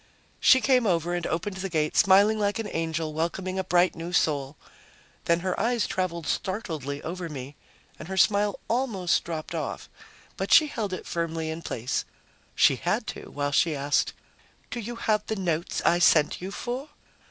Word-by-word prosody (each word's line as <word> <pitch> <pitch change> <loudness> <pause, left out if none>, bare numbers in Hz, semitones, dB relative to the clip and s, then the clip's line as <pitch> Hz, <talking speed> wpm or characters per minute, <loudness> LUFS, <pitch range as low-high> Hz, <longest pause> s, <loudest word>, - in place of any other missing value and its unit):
She 260 - +6
came 255 -4 +3
over 175 -1 +1
and 175 -1 -2
opened 185 +4 -3
the 195 +1 -3
gate, 155 -3 0
smiling 200 +3 +5
like 205 0 0
an 225 -2 -3
angel 160 -1 -2
welcoming 185 +4 -2
a - - 0
bright 180 0 +3
new 165 +1 -6
soul. 145 -4 0 0.7
Then 170 0 +2
her 185 0 -2
eyes 235 -2 +1
traveled 170 -3 -2
startledly 160 - -3
over 175 0 -5
me 140 -1 -7 0.4
and 155 - -8
her 190 0 -5
smile 205 +1 +3
almost 225 -8 +1
dropped 160 -2 -5
off. - - -4 0.5
But - - -3
she 320 - +8
held 220 -9 -3
it 185 - -5
firmly 165 -1 -2
in 160 +1 -6
place. 125 -4 -2 0.5
She - - +5
had - - -1
to, - - -10
while 145 0 -2
she 155 +2 +2
asked, 140 +1 +1 0.6
"Do 240 - -3
you 235 +2 -5
have 215 -2 0
the 220 - -1
notes 170 -4 -2
I 175 - +4
sent 155 -3 +4
you 185 - -4
for?" 250 +8 -5
175 Hz, 175 wpm, -26 LUFS, 160-205 Hz, 0.7 s, she